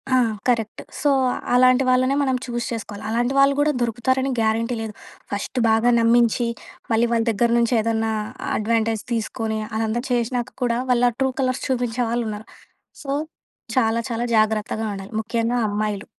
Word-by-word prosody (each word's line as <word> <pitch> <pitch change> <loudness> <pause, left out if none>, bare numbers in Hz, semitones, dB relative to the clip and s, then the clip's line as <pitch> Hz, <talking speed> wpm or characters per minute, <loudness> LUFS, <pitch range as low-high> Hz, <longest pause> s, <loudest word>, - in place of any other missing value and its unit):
ఆ! - - +5 0.3
Correct. 225 -3 0 0.2
So, 295 - +3 0.4
అలాంటి 255 +1 +5
వాళ్ళనే 255 +2 +3
మనం 260 -2 +1
చూస్ 240 -1 -3
చేసుకోవాలి. 210 -3 -6
అలాంటి 240 +3 0
వాళ్ళు 275 0 +5
కూడా 300 +1 +3
దొరుకుతారని 260 +3 0
గ్యారంటీ 225 +2 +1
లేదు. 220 -1 -5 0.4
ఫస్ట్ 205 +5 -4
బాగా 225 +2 +3
నమ్మించి, 235 +1 +3 0.4
మళ్ళీ 230 +1 +3
వాళ్ళ 230 -1 +2
దగ్గర 230 +2 +1
నుంచి 235 +1 +1
ఏదన్నా 225 0 0 0.5
అడ్వాంటేజ్ 225 0 0
తీసుకొని, 220 -1 -2 0.2
అదంతా 225 +1 -1
చేసినాక 240 0 0
కూడా, 235 -1 +1
వాళ్ళ 245 0 +4
ట్రూ 265 -1 +2
కలర్స్ 255 -1 0
చూపించే 245 -2 -1
వాళ్ళు 240 0 0
ఉన్నారు. 210 +1 -7 0.6
సో, 275 - -8 0.7
చాలా 230 -2 +3
చాలా 235 +1 -2
జాగ్రత్తగా 220 0 +1
ఉండాలి 195 +1 -8
ముఖ్యంగా 230 +2 -1
అమ్మాయిలు. 205 -1 -2
230 Hz, 150 wpm, -22 LUFS, 220-245 Hz, 0.7 s, ఆ